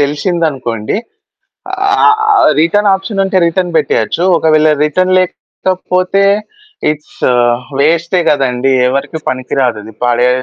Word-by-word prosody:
తెలిసిందనుకోండి, 145 - -2 1.1
ఆహ్, 435 - +5 0.2
ఆహ్, 405 - +4
return 205 +5 +2
ఆప్షనుంటే, 195 -1 -1
return 175 0 -2
పెట్టేయొచ్చు. 150 +1 0 0.2
ఒకవేళ 155 -1 +3 0.2
రిటర్న్ 185 +5 +1
లేకపోతే 185 +1 -2 0.7
ఇట్స్ 150 0 -11 0.6
వేస్టే 170 +4 +1
గదండీ. 135 -2 0 0.2
ఎవరికి 140 +4 -3
పనికిరాదది 125 -4 -3
పడే 120 +1 +2
155 Hz, 90 wpm, -12 LUFS, 130-185 Hz, 1.1 s, ఆహ్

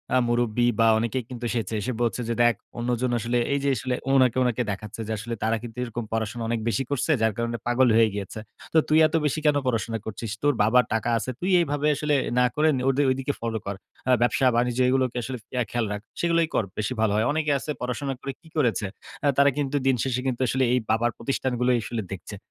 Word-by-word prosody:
আ - - +6
মুরুব্বি 120 0 +2
বা 115 - +5
অনেকেই 115 +3 -1
কিন্তু 120 -2 -8
এসেছে 115 -3 -2
এসে 125 +5 -2
বলছে 120 +1 0
যে, - - +1
"দেখ 120 -1 +4 0.2
অন্যজন 125 +1 0
আসলে" 120 +2 0 0.2
এই 140 - +1
যে 140 - +2
আসলে 125 +3 -2 0.2
ওনাকে, 130 -2 +4
ওনাকে 125 -1 0
দেখাচ্ছে। 105 +3 -6
যে - - -3
আসলে 115 +2 -5
"তারা 115 +1 +1
কিন্তু 120 0 -9
এরকম 120 -1 -4
পড়াশোনা 115 +1 -2
অনেক 115 -1 0
বেশি 115 +3 +1
করছে 140 +2 0
যার 110 -1 +2
কারণে 115 0 -2
পাগল 125 +1 +4
হয়ে 115 -1 +5
গিয়েছে। 100 +1 -5 0.3
তো - - +4
তুই 155 - +4
এত 160 - -4
বেশি 150 +1 0
কেন 150 - +4
পড়াশোনা 115 -1 -1
করছিস? 110 0 -5
তোর 145 -1 +4
বাবার 125 +3 +4
টাকা 115 +1 0
আছে, 130 - -4
তুই 180 - -2
এভাবে 145 -2 0
আসলে 150 0 0 0.2
না 125 - +5
করে 155 +1 +3 0.2
ঐ - - +5 0.2
ঐদিকে 135 +2 -1
ফলো 115 -1 -2
কর। 100 - -3 0.3
আ - - +5
ব্যবসা 120 +2 +2
বাণিজ্য 120 +1 +1
এগুলোকে 130 -1 +1
আসলে 130 0 -4 0.2
ইয়া 125 -1 +1
খেয়াল 120 -2 0
রাখ। 105 0 -4 0.2
সেগুলোই 170 -1 +2
কর - - +2
বেশি 105 +4 -1
ভালো 110 - +3
হয়। 110 - +2
অনেকেই 150 -1 +1
আছে 150 - -4
পড়াশোনা 135 +3 -2
করে 135 - -4
কী 165 - -19
করেছে? 115 -6 +1 0.4
আ - - +4
তারা 140 0 +6
কিন্তু 145 -1 -1
দিনশেষে 125 -1 +1
কিন্তু 130 -1 -2
আসলে 130 +3 +1
এই 125 - +3
বাবার 115 +2 +2
প্রতিষ্ঠানগুলোই 125 -2 0
আসলে 115 +2 -3
দেখছে।" 100 +2 -7
120 Hz, 220 wpm, -25 LUFS, 115-130 Hz, 0.4 s, আ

